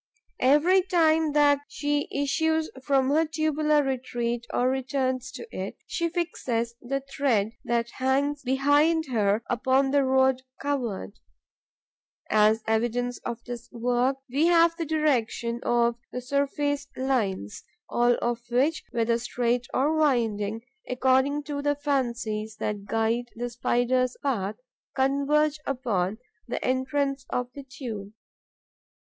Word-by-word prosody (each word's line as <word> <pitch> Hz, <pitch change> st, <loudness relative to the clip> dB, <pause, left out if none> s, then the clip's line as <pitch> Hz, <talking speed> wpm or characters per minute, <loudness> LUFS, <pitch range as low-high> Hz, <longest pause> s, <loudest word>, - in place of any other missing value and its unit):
Every 300 Hz, +9 st, +5 dB
time 320 Hz, -4 st, +2 dB
that 290 Hz, -1 st, +5 dB
she 290 Hz, -1 st, -1 dB
issues 315 Hz, +3 st, 0 dB
from 270 Hz, -1 st, +2 dB
her 315 Hz, +3 st, +4 dB
tubular 305 Hz, -1 st, +1 dB
retreat 240 Hz, -3 st, -2 dB
or 250 Hz, -, +1 dB
returns 260 Hz, -1 st, -1 dB
to -, -, -7 dB
it, -, -, -5 dB
she 335 Hz, -1 st, -1 dB
fixes 255 Hz, -9 st, -2 dB
the 275 Hz, +2 st, -2 dB
thread 265 Hz, -6 st, 0 dB
that 235 Hz, 0 st, 0 dB
hangs 280 Hz, +2 st, 0 dB
behind 290 Hz, +5 st, +3 dB
her 210 Hz, -1 st, +2 dB
upon 260 Hz, +2 st, +2 dB
the 285 Hz, 0 st, +3 dB
road 265 Hz, 0 st, +3 dB, 0.2 s
covered. 245 Hz, -8 st, -3 dB, 1.1 s
As 215 Hz, +1 st, +4 dB
evidence 240 Hz, +2 st, 0 dB
of 235 Hz, -1 st, -6 dB
this 245 Hz, -1 st, -7 dB
work, 245 Hz, +3 st, +1 dB
we 280 Hz, +6 st, +2 dB
have 335 Hz, -1 st, +5 dB
the 335 Hz, -, -3 dB
direction 245 Hz, -6 st, 0 dB
of 235 Hz, 0 st, +2 dB
the 250 Hz, -, -3 dB
surface 280 Hz, +2 st, -1 dB
lines, 215 Hz, -, -1 dB, 0.2 s
all 240 Hz, 0 st, +3 dB
of 240 Hz, 0 st, -1 dB
which, 270 Hz, +7 st, +1 dB
whether 230 Hz, 0 st, +1 dB
straight 245 Hz, +1 st, -1 dB
or 290 Hz, +5 st, +1 dB
winding, 225 Hz, -7 st, +1 dB, 0.3 s
according 265 Hz, +3 st, +2 dB
to 285 Hz, 0 st, -4 dB
the 290 Hz, 0 st, +1 dB
fancies 235 Hz, -7 st, -2 dB
that 210 Hz, -2 st, -3 dB
guide 225 Hz, +3 st, 0 dB
the 240 Hz, +1 st, -4 dB
Spider's 245 Hz, +1 st, +1 dB
path, 215 Hz, -7 st, -1 dB, 0.4 s
converge 280 Hz, +3 st, +2 dB
upon 220 Hz, -8 st, -1 dB, 0.3 s
the 240 Hz, -, -3 dB
entrance 270 Hz, +1 st, 0 dB
of 250 Hz, 0 st, -2 dB
the 285 Hz, -, -8 dB
tube. 240 Hz, -7 st, -7 dB
260 Hz, 125 wpm, -26 LUFS, 235-285 Hz, 1.1 s, Every